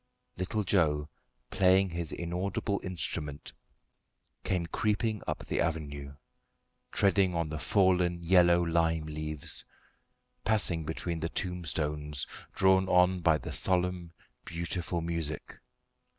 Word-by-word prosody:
Little 105 +4 -2
Joe, 75 -6 +2 0.4
playing 95 0 +4
his 85 -1 -3
inaudible 90 +3 -2
instrument, 75 -5 -4 0.9
came 90 -2 0
creeping 105 +4 -1
up - - -3
the - - -1
avenue, 70 -4 -3 0.8
treading 95 -2 +3
on 85 -2 -1
the 80 0 -4
fallen 90 -1 +2
yellow 85 0 +5
lime 80 -1 +1
leaves, 75 -1 -3 0.8
passing 90 -7 +2
between 80 +1 -3
the 85 - -2
tombstones, 75 -6 -2 0.3
drawn 95 0 +4
on 90 0 +4
by 80 -2 +4
the 70 - -7
solemn, 90 -2 0 0.3
beautiful 85 0 -3
music. 80 -3 -3
85 Hz, 105 wpm, -30 LUFS, 80-95 Hz, 0.9 s, yellow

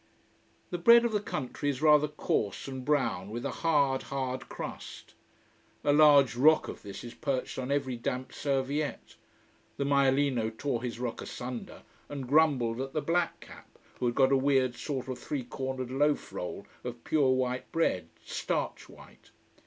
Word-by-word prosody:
The 175 - -2
bread 235 +6 +7
of 235 - +1
the 210 - +1
country 145 -6 -3
is 135 -3 -2
rather 150 -1 +5
coarse 105 -8 -2
and 130 -1 -6
brown, 130 -10 0
with 120 +3 -5
a - - -1
hard, 145 -5 +2
hard 130 -1 -4
crust. - - -8 0.7
A 145 - +3
large 145 -4 +6
rock 155 +5 +5
of - - -7
this 100 -2 -8
is 120 0 -8
perched 135 -3 -3
on 130 0 -4
every 140 -3 0
damp 125 +2 -4
serviette. 135 - -2 0.6
The 140 - 0
maialino 135 -5 +2
tore 130 -4 -1
his 120 -2 -4
rock 120 -2 -3
asunder, 125 -1 -7 0.3
and 140 -3 -5
grumbled 130 -5 +3
at 135 0 -5
the 155 - 0
black 170 +3 0
cap, - - -14 0.2
who 125 - +1
had 120 - -1
got 135 -1 +4
a 135 - +5
weird 130 -2 +2
sort 130 0 -4
of 130 -1 -5
three 140 -4 -3
cornered 130 +1 -4
loaf 145 +2 +1
roll 90 +3 -5 0.2
of 120 -1 -7
pure 145 -4 +2
white 130 -1 0
bread 95 - 0 0.2
starch - - -3
white. - - -16
135 Hz, 170 wpm, -30 LUFS, 125-145 Hz, 0.7 s, bread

